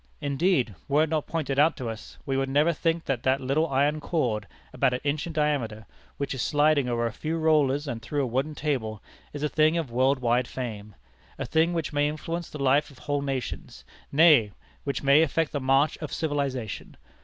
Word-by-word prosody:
Indeed, 140 - +1
were 145 +2 +3
it 160 - -2
not 155 -2 -1
pointed 140 -4 -1
out 155 +2 +4
to 130 -4 -4
us, 110 -1 -8
we 135 - -1
would 135 0 0
never 150 +5 +3
think 165 +1 -1
that 130 -4 -1
that 130 +1 +2
little 140 +5 +1
iron 145 +2 +1
cord, 120 - -1 0.3
about 130 -2 +2
an - - -3
inch 145 +2 -1
in 165 - -6
diameter, 135 -9 -1 0.3
which 140 - -2
is 130 - -3
sliding 145 -3 +2
over 120 -1 0
a 115 - -2
few 160 +1 -3
rollers 150 -3 +2
and 115 -4 -4
through 145 +5 -2
a - - +1
wooden 135 +5 -2
table, 120 -9 -2 0.3
is 145 0 -6
a - - +3
thing 155 +2 +3
of 155 -8 -3
world 130 +3 +2
wide 120 0 +1
fame 105 -5 -6 0.4
a - - -3
thing 160 +2 +2
which 165 -3 -2
may 145 0 +2
influence 165 +3 -5
the - - -8
life 140 +1 +2
of 140 - -16
whole 145 +1 -2
nations; 135 -3 -5 0.3
nay, 145 -8 +6 0.3
which 140 0 -2
may 140 +2 +6
affect 160 0 +1
the 145 - -2
march 135 +3 +2
of 155 - -6
civilization. 140 -7 -3
140 Hz, 205 wpm, -26 LUFS, 130-155 Hz, 0.4 s, nay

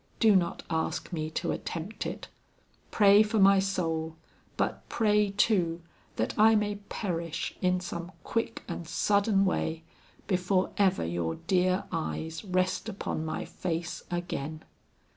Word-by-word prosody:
Do 220 -3 +6
not 180 -2 +1
ask 160 +2 -2
me 155 -2 -2
to 170 +2 -2
attempt 195 +6 -4
it! - - -6 0.6
Pray 205 -1 +6
for 215 +1 +1
my 195 -1 +6
soul, 165 -5 -1 0.4
but - - -2
pray 210 -2 +3
too, 185 -5 +1 0.3
that - - -1
I 220 +1 +7
may 205 -1 0
perish 170 -5 -3
in 180 0 +2
some 175 0 -6
quick 230 0 -2
and 170 - -5
sudden 200 +3 +2
way 165 -3 -1 0.4
before 185 0 +1
ever 190 - +3
your 85 -1 -2
dear 185 0 +1
eyes 160 -1 -3
rest 185 +2 0
upon 195 -6 -3
my 160 - -3
face 170 -1 -4
again. 170 -3 -4
185 Hz, 135 wpm, -29 LUFS, 165-200 Hz, 0.6 s, I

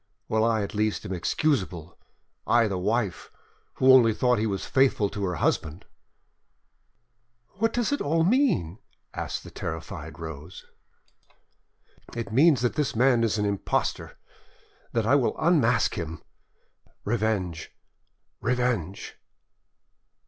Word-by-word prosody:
Well, 110 0 +1
I 110 -2 +1
at 100 - -6
least 105 0 -1
am - - -4
excusable, 90 - -1 0.5
I 120 -1 +4
the 95 -3 -3
wife, 105 0 -1 0.5
who 130 0 +6
only 115 -4 +6
thought 125 -1 +2
she 110 - 0
was 95 -2 -3
faithful 130 -6 +2
to 100 - -4
her 90 -2 -2
husband!" 80 +2 -1 1.7
"What 225 +1 +2
does 240 +1 -1
it 285 - -1
all 160 +3 +1
mean?" 185 - +1 0.3
asked - - -4
the - - -11
terrified 80 -1 -6
Rose. 80 +1 -9 1.5
"It 115 -3 -5
means 140 0 +5
that 120 - +1
this 150 -6 -1
man 120 0 +3
is 110 -1 +1
an 105 - 0
impostor 100 -1 -1
and - - -25
that 115 -2 0
I 120 - +3
will 140 -4 +2
unmask 140 -9 +3
him. 80 -3 -6 0.8
Revenge! 100 -7 -1 0.7
revenge!" 120 -8 -2
110 Hz, 125 wpm, -26 LUFS, 95-130 Hz, 1.7 s, who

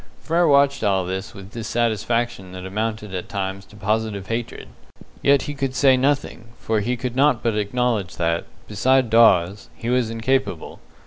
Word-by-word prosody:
Frere 170 +1 +1
watched 140 -3 +3
all 95 -3 +1
this 95 +2 -5
with 100 +1 -11
dissatisfaction 115 -3 -1
that 95 0 -7
amounted 105 +1 -3
at 95 +4 -5
times 95 -2 -4
to 100 - -18
positive 105 -1 -2
hatred. 115 0 -4 0.5
Yet 140 -1 +4
he 145 - -5
could 135 -2 -3
say 135 0 +5
nothing, 135 -3 -1
for 110 -1 -1
he 120 +4 -1
could 125 0 -4
not 135 -2 +3
but 115 -2 +1
acknowledge 105 -2 -1
that, 85 -1 0 0.2
beside 130 +3 +2
Dawes, 100 -4 +4
he 120 +1 -4
was 125 -3 +1
incapable. 115 -5 -2
115 Hz, 165 wpm, -22 LUFS, 100-125 Hz, 0.5 s, say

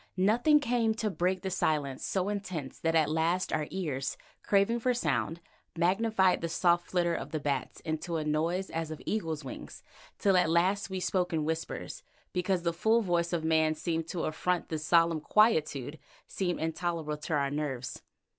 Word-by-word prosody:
Nothing 240 +11 +4
came 235 -4 +1
to 220 -2 -1
break 185 +1 -1
a 190 - -1
silence 145 -7 0
so 190 -1 0
intense 185 -9 -4
that 165 0 0
at 155 -2 +4
last 165 +4 0
our 150 -1 0
ears, 145 -8 -3 0.2
craving 200 +4 +2
for 250 +1 +1
sound, 165 - -1 0.4
magnified 190 +2 +3
the 170 - -2
soft 175 +1 +2
flitter 175 -2 +1
of - - -4
the 155 - -2
bats 140 -3 -2
into 160 +2 -3
a 155 - -2
noise 165 +5 -1
as 165 -1 -3
of 155 - -6
eagle's 165 -8 -2
wings, - - -8 0.3
till 195 -3 +3
at 180 -3 +3
last 190 +6 +2
we 190 0 -3
spoke 180 -1 0
in 155 -2 0
whispers, 160 - -4 0.3
because 180 -1 0
the 170 -1 0
full 220 +7 +2
voice 170 -2 0
of 170 -2 -1
man 160 -1 +3
seemed 165 0 -2
to 175 -2 -3
affront 175 +3 -1
the 160 - -2
solemn 165 +1 +3
quietude, 155 - +2 0.3
seemed 180 -3 -2
intolerable 160 -1 -2
to 150 +2 -5
our 140 -1 +1
nerves. 140 -4 -3
170 Hz, 175 wpm, -30 LUFS, 155-190 Hz, 0.4 s, Nothing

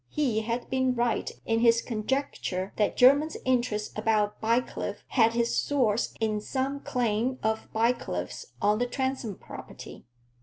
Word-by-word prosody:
He 255 -8 0
had 235 +2 -3
been 260 -1 +1
right 235 -1 0 0.2
in 225 0 +1
his 230 0 +5
conjecture 215 -5 -2
that 210 - +1
Jermyn's 285 +5 +5
interest 240 -5 0
about 215 -1 0
Bycliffe 230 +3 -1
had 230 -2 +3
its 235 0 +1
source 235 -7 +1
in 215 -1 0
some 270 +4 -2
claim 245 -1 0
of 220 0 -1
Bycliffe's 220 - -1
on 210 +1 +2
the 245 - +1
Transome 260 -5 -2
property. - - -11
230 Hz, 140 wpm, -28 LUFS, 215-255 Hz, 0.2 s, his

